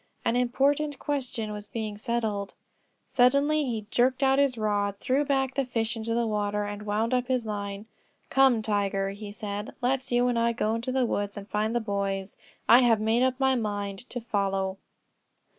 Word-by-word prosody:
An 230 - +2
important 275 +4 +1
question 255 -7 -3
was 210 0 -7
being 215 -2 -4
settled. 215 -2 -2 0.5
Suddenly 280 +4 +3
he 225 -4 -3
jerked 255 +2 +2
out 270 0 +4
his 275 -4 +2
rod, 205 -2 0
threw 270 +3 +1
back 270 -2 0
the 275 - +1
fish 230 -2 -1
into 225 0 -2
the 235 0 +1
water 210 -1 -1
and 205 +1 -6
wound 220 +4 0
up 250 -1 +1
his 255 -3 0
line. 200 -1 -4 0.5
"Come, 265 -5 +4
Tiger," 200 -2 0
he 205 +1 -8
said; 205 0 -5
"let's 260 +1 -1
you 245 +1 +3
and 240 -1 +1
I 235 0 +2
go 225 0 0
to 250 +3 -3
the 260 -1 +2
woods 205 -2 -2
and 200 0 -7
find 215 +2 -1
the - - +3
boys; 200 -2 -2 0.3
I 240 - +8
have 235 -4 +4
made 220 +3 +2
up 260 0 +1
my 265 -1 +3
mind 205 -2 -3
to 245 - -4
'follow.'" 195 -3 -1
225 Hz, 185 wpm, -27 LUFS, 205-255 Hz, 0.5 s, I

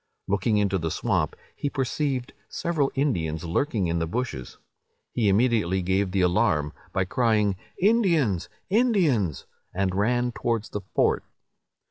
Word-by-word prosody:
Looking 100 +3 +1
into 100 -2 +1
the 80 -1 -2
swamp, - - 0 0.2
he 145 - -2
perceived 135 -1 -2 0.2
several 155 -5 0
Indians 85 - 0
lurking 100 - 0
in 85 0 0
the 80 - -1
bushes. 85 - -4 0.5
He 110 -4 +1
immediately 100 -4 +2
gave 95 +2 +1
the 95 +1 0
alarm, 90 -5 +2 0.2
by 95 - 0
crying, 105 -2 +2 0.2
"Indians! 170 - +2 0.2
Indians!" 175 - +2 0.3
and 95 -1 0
ran 120 +5 +1
towards 115 -2 -2
the 105 - -4
fort. - - +2
105 Hz, 130 wpm, -26 LUFS, 95-130 Hz, 0.5 s, immediately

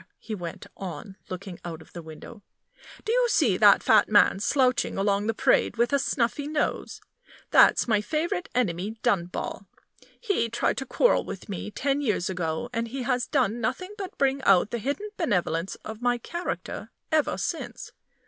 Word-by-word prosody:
he 220 - -7
went 175 -5 -6
on, 190 +1 -7
looking 185 -1 -7
out 165 -2 -6
of 160 - -17
the 175 - -7
window; 160 +7 -11 0.6
"do 440 - 0
you - - +3
see 265 - +3
that 205 +1 +6
fat 215 -2 +5
man 205 -2 +5
slouching 255 +3 +1
along 200 +1 +1
the 225 - +1
Parade, - - +2
with 240 +4 +1
a 280 - +4
snuffy 270 +2 0
nose? 300 -1 -2 0.5
That's - - +6
my 215 -3 +3
favorite 335 - -2
enemy, 210 -2 -1
Dunball. 175 -2 -1 0.5
He 400 - 0
tried 235 - 0
to 270 - -4
quarrel - - +3
with 195 - -8
me 200 +1 -4
ten 275 +6 -1
years 205 -8 0
ago, 165 +2 -2
and 230 0 -1
he 260 +2 -5
has 250 -1 0
done 220 +5 +1
nothing 370 - -2
but 390 -2 -7
bring 275 0 +1
out 195 -3 +4
the 235 - -2
hidden 290 - -3
benevolence 180 - 0
of 220 +1 -7
my 245 0 +2
character 345 +9 -5 0.2
ever 310 -2 +2
since. - - -4
230 Hz, 170 wpm, -26 LUFS, 195-280 Hz, 0.6 s, that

